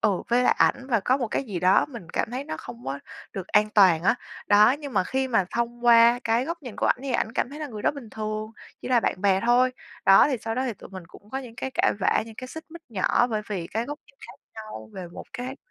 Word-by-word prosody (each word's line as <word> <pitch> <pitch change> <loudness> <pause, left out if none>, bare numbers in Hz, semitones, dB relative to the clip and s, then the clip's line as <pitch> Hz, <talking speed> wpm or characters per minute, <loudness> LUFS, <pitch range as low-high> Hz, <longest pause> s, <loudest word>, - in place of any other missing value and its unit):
ừ, 200 -4 +1
với 245 +1 +3
lại - - +4
ảnh 260 - +2
và 230 -5 +1
có 250 +7 +2
một 245 -5 -2
cái 275 - -2
gì 200 -8 -5
đó 185 - +4
mình 235 - -10
cảm - - -1
thấy 255 +3 -4
nó 310 - -5
không 120 0 -10
có 135 +1 -3 0.3
được 190 -2 -6
an 210 +1 +3
toàn 185 -6 +5
á. 200 - +4 0.3
Đó, 210 +2 +6
nhưng 285 -4 -7
mà - - +2
khi 265 +5 -1
mà 225 -6 +2
thông 235 0 -3
qua 235 +1 +7
cái 230 +2 +2
góc 335 +1 -5
nhìn 245 -5 -8
của - - 0
ảnh - - +2
thì 270 -2 -3
ảnh 225 - 0
cảm 245 - -1
thấy 295 - -8
là 305 - -3
người 215 -6 -8
đó - - +3
bình 265 -7 -10
thường, 215 0 -4 0.3
chỉ - - -5
là 250 -2 +4
bạn 185 - -1
bè 195 -1 +3
thôi. 250 +1 +4 0.3
Đó, 195 +8 +7
thì 260 - 0
sau 225 0 -3
đó 255 - -1
thì 245 - -1
tụi - - -13
mình 185 -3 -9
cũng 205 +4 -17
có 265 - -3
những 250 -4 -9
cái 265 - -4
cãi - - +3
vã, - - +2
những 225 - -11
cái 255 +3 -7
xích 320 +4 -9
mích 335 +1 -11
nhỏ 225 +2 +2
bởi 215 -3 -2
vì 185 -5 -3
cái 225 +6 -2
góc 290 +3 -6
nhìn - - -23
khác - - -11 0.2
nhau 215 - -9
về 185 -2 -7
một - - -9
cái 260 +1 -5
230 Hz, 285 wpm, -25 LUFS, 200-255 Hz, 0.3 s, qua